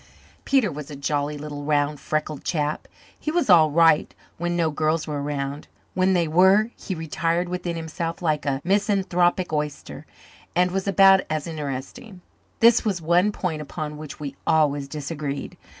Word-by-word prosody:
Peter 265 Hz, -8 st, +2 dB
was 145 Hz, -1 st, -8 dB
a 145 Hz, -, -7 dB
jolly 145 Hz, +1 st, -2 dB
little 145 Hz, 0 st, -7 dB
round 145 Hz, 0 st, 0 dB
freckled 155 Hz, -1 st, -3 dB
chap. 150 Hz, -2 st, -2 dB, 0.3 s
He -, -, -3 dB
was 310 Hz, -, +2 dB
all 160 Hz, -3 st, +7 dB
right 165 Hz, 0 st, +3 dB, 0.2 s
when 175 Hz, 0 st, -1 dB
no 165 Hz, -2 st, +1 dB
girls 155 Hz, +1 st, 0 dB
were 150 Hz, -2 st, -3 dB
around; 140 Hz, 0 st, -4 dB, 0.3 s
when 185 Hz, +1 st, +2 dB
they 170 Hz, -2 st, +2 dB
were 190 Hz, +7 st, +4 dB
he 190 Hz, -, -5 dB
retired 165 Hz, +2 st, -1 dB
within 180 Hz, -1 st, -3 dB
himself 165 Hz, +1 st, -4 dB
like 155 Hz, -4 st, 0 dB
a 135 Hz, -1 st, -1 dB
misanthropic 185 Hz, -3 st, +1 dB
oyster, 150 Hz, -1 st, -4 dB, 0.5 s
and 180 Hz, 0 st, +3 dB
was 195 Hz, +1 st, -2 dB
about 195 Hz, -1 st, +6 dB
as 155 Hz, -1 st, -2 dB
interesting. 160 Hz, -, -6 dB, 0.4 s
This 230 Hz, 0 st, +6 dB
was 205 Hz, -4 st, 0 dB
the 170 Hz, -, -11 dB
one 175 Hz, +5 st, +3 dB
point 170 Hz, -6 st, -3 dB
upon 150 Hz, 0 st, -6 dB
which 150 Hz, -1 st, -9 dB
we 140 Hz, -2 st, -6 dB
always 145 Hz, -3 st, +2 dB
disagreed. 145 Hz, -1 st, -5 dB
160 Hz, 165 wpm, -24 LUFS, 150-180 Hz, 0.5 s, all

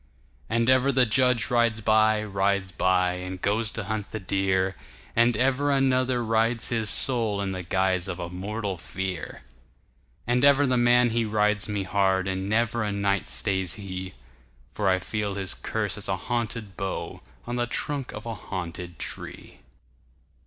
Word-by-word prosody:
And 115 Hz, 0 st, +1 dB
ever 130 Hz, +1 st, +4 dB
the 130 Hz, -1 st, +4 dB
judge 125 Hz, +1 st, +3 dB
rides 120 Hz, -2 st, +2 dB
by, 110 Hz, 0 st, +3 dB
rides 100 Hz, -1 st, 0 dB
by, 90 Hz, 0 st, +2 dB
And 90 Hz, 0 st, -6 dB
goes 105 Hz, +4 st, +1 dB
to 115 Hz, -4 st, -3 dB
hunt 110 Hz, +1 st, -4 dB
the 110 Hz, -, -5 dB
deer, 95 Hz, 0 st, 0 dB, 0.4 s
And 115 Hz, -1 st, +3 dB
ever 135 Hz, +3 st, +1 dB
another 130 Hz, -3 st, +2 dB
rides 115 Hz, +1 st, +1 dB
his 110 Hz, -2 st, 0 dB
soulIn 105 Hz, -7 st, +2 dB
the 95 Hz, -1 st, -4 dB
guise 95 Hz, 0 st, 0 dB
of 90 Hz, -2 st, -4 dB
a 90 Hz, -1 st, -4 dB
mortal 100 Hz, +2 st, -4 dB
fear. 90 Hz, -1 st, -5 dB, 0.8 s
And 120 Hz, +1 st, +1 dB
ever 140 Hz, 0 st, +6 dB
the 130 Hz, -2 st, +1 dB
man 120 Hz, 0 st, +4 dB
he 115 Hz, +1 st, +1 dB
rides 105 Hz, -1 st, +1 dB
me 105 Hz, -1 st, -1 dB
hard, 95 Hz, 0 st, +1 dB
And 95 Hz, +1 st, -2 dB
never 115 Hz, +1 st, +1 dB
a 105 Hz, -1 st, -1 dB
night 100 Hz, 0 st, 0 dB
stays 95 Hz, -3 st, +1 dB
he; 95 Hz, -2 st, -7 dB, 0.6 s
For 100 Hz, -2 st, 0 dB
I 95 Hz, -, +3 dB
feel 100 Hz, +2 st, -3 dB
his 95 Hz, -2 st, -1 dB
curse 105 Hz, -3 st, -3 dB
as 100 Hz, -, -4 dB
a 95 Hz, -, 0 dB
haunted 115 Hz, -2 st, -3 dB
boughOn 95 Hz, -, -6 dB
the 120 Hz, 0 st, 0 dB
trunk 140 Hz, +2 st, -2 dB
of 105 Hz, -, -8 dB
a 115 Hz, -, -3 dB
haunted 90 Hz, -4 st, -6 dB
tree. -, -, -7 dB
105 Hz, 160 wpm, -26 LUFS, 95-120 Hz, 0.8 s, ever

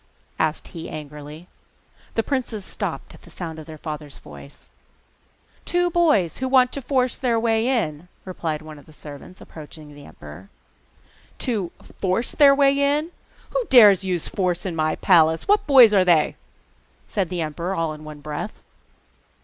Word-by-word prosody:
asked 155 Hz, 0 st, -1 dB
he 165 Hz, -1 st, -8 dB
angrily. 150 Hz, +2 st, -9 dB, 0.7 s
The 225 Hz, -, +1 dB
princes 235 Hz, -7 st, -3 dB
stopped -, -, -5 dB
at -, -, -16 dB
the -, -, -16 dB
sound 165 Hz, -3 st, -7 dB
of 155 Hz, -, -11 dB
their 155 Hz, -1 st, -9 dB
father's 150 Hz, -2 st, -7 dB
voice. 70 Hz, -2 st, -14 dB, 0.9 s
'Two 355 Hz, 0 st, 0 dB
boys 305 Hz, -, +2 dB
who 260 Hz, -, -1 dB
want 255 Hz, -1 st, +4 dB
to 280 Hz, -, -5 dB
force 255 Hz, -1 st, 0 dB
their 235 Hz, -3 st, +1 dB
way 225 Hz, 0 st, +1 dB
in,' 180 Hz, -, -1 dB, 0.2 s
replied 160 Hz, -4 st, -4 dB
one 155 Hz, -1 st, -11 dB
of -, -, -19 dB
the 155 Hz, -, -16 dB
servants, 150 Hz, +5 st, -12 dB
approaching 150 Hz, -1 st, -12 dB
the 145 Hz, 0 st, -13 dB
emperor. 80 Hz, +4 st, -13 dB, 0.9 s
'To 210 Hz, -8 st, -2 dB, 0.3 s
FORCE 190 Hz, +5 st, 0 dB
their 280 Hz, -2 st, +6 dB
way 275 Hz, 0 st, +3 dB, 0.2 s
in? 315 Hz, +3 st, -5 dB, 0.4 s
Who -, -, 0 dB
dares 210 Hz, -7 st, +8 dB
to 195 Hz, -, -6 dB
use 180 Hz, -3 st, -2 dB
force 180 Hz, -2 st, -2 dB
in 180 Hz, -3 st, -3 dB
my 155 Hz, -1 st, 0 dB
palace? 160 Hz, -3 st, +3 dB
What 415 Hz, -4 st, +2 dB
boys 255 Hz, -6 st, +7 dB
are 190 Hz, -2 st, +5 dB
they?' 170 Hz, -4 st, +3 dB, 0.7 s
said 195 Hz, -5 st, -2 dB
the 180 Hz, -2 st, -3 dB
emperor 170 Hz, +4 st, -3 dB
all 165 Hz, -3 st, -1 dB
in 155 Hz, 0 st, -11 dB
one 150 Hz, -1 st, -10 dB
breath. 150 Hz, +8 st, -6 dB
180 Hz, 165 wpm, -22 LUFS, 155-235 Hz, 0.9 s, dares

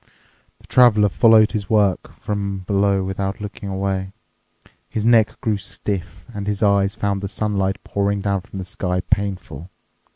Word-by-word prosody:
The -, -, -20 dB
Traveler 110 Hz, -5 st, +5 dB
followed 110 Hz, +1 st, +5 dB
this 105 Hz, -4 st, -4 dB
work 100 Hz, -5 st, +2 dB
from 100 Hz, -2 st, -3 dB
below 100 Hz, 0 st, +2 dB
without 95 Hz, +1 st, -3 dB
looking 105 Hz, -1 st, -7 dB
away. 95 Hz, 0 st, -2 dB, 0.8 s
His 110 Hz, -1 st, -2 dB
neck 115 Hz, -2 st, +4 dB
grew 110 Hz, -5 st, 0 dB
stiff, 95 Hz, -3 st, -5 dB
and 100 Hz, -1 st, -5 dB
his 105 Hz, 0 st, -1 dB
eyes 100 Hz, 0 st, +3 dB
found 100 Hz, -3 st, -1 dB
the 100 Hz, -, -3 dB
sunlight 100 Hz, -2 st, -1 dB
pouring 100 Hz, 0 st, -1 dB
down 100 Hz, -1 st, 0 dB
from 95 Hz, -, -11 dB
the 95 Hz, -, -5 dB
sky 90 Hz, 0 st, -2 dB
painful. 95 Hz, -6 st, -3 dB
100 Hz, 155 wpm, -21 LUFS, 95-105 Hz, 0.8 s, Traveler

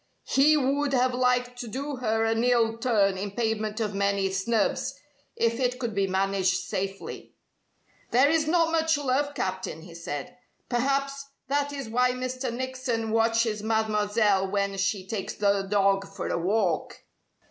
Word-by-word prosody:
He 300 Hz, +3 st, +4 dB
would 280 Hz, +1 st, +1 dB
have 255 Hz, 0 st, +2 dB
liked 250 Hz, 0 st, +1 dB
to 245 Hz, -, -5 dB
do 275 Hz, +4 st, -4 dB
her 225 Hz, -2 st, 0 dB
an 225 Hz, +1 st, +1 dB
ill 235 Hz, -2 st, +3 dB
turn 205 Hz, -6 st, +2 dB
in 200 Hz, +1 st, -3 dB
payment 220 Hz, -1 st, -1 dB
of 210 Hz, -2 st, -1 dB
many 200 Hz, -1 st, +1 dB
snubs, 220 Hz, +6 st, 0 dB, 0.4 s
if 230 Hz, +1 st, +1 dB
it 250 Hz, -1 st, 0 dB
could 240 Hz, -3 st, -3 dB
be 195 Hz, -1 st, +1 dB
managed 190 Hz, -1 st, +1 dB
safely. 195 Hz, +1 st, -5 dB, 0.7 s
"There 255 Hz, +4 st, +5 dB
is 310 Hz, 0 st, +2 dB
not 330 Hz, 0 st, +3 dB
much 320 Hz, -1 st, +2 dB
love, 285 Hz, +1 st, 0 dB
Captain," 185 Hz, -4 st, -3 dB
he 175 Hz, -1 st, -12 dB
said. 155 Hz, -, -6 dB, 0.3 s
"Perhaps 275 Hz, +2 st, 0 dB, 0.2 s
that 285 Hz, 0 st, +1 dB
is 275 Hz, -4 st, -5 dB
why 250 Hz, +2 st, +2 dB
Mr. 255 Hz, 0 st, -3 dB
Nickson 250 Hz, -2 st, -3 dB
watches 225 Hz, -1 st, +2 dB
Mademoiselle 210 Hz, -2 st, +1 dB
when 200 Hz, 0 st, -1 dB
she 195 Hz, 0 st, 0 dB
takes 195 Hz, 0 st, -4 dB
the 200 Hz, -1 st, +2 dB
dog 195 Hz, -1 st, +2 dB
for -, -, -6 dB
a -, -, 0 dB
walk." 185 Hz, -2 st, 0 dB
225 Hz, 155 wpm, -27 LUFS, 200-255 Hz, 0.7 s, There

